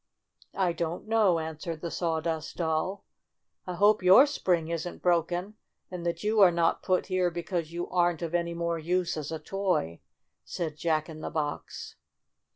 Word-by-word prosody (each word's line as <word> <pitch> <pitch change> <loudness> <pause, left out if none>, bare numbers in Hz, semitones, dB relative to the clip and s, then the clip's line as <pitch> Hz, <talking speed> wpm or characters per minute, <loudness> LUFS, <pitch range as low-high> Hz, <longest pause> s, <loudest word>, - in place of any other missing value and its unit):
"I 185 -3 +2
don't 170 +3 -4
know," 215 -6 +3
answered 160 0 -5
the 170 - -4
Sawdust 160 -2 -2
Doll. 170 +4 -1 0.6
"I 180 - -3
hope 205 +3 +4
your 185 +9 +8
spring 175 - 0
isn't 170 +1 -4
broken, 175 +4 0 0.3
and 180 -2 -5
that 170 - -2
you 215 0 +2
are 190 - +9
not 170 -1 +1
put 185 -1 +1
here 185 -1 +1
because 170 -1 -3
you 175 +1 -4
aren't 175 -2 +1
of 165 0 -4
any 170 -1 0
more 170 0 -1
use 175 +2 0
as 155 -1 -5
a 160 - -2
toy," 180 - -1 0.4
said 160 -4 -4
Jack 155 -1 0
in 160 -2 -9
the - - -4
Box. 150 -2 -4
170 Hz, 165 wpm, -28 LUFS, 160-185 Hz, 0.6 s, are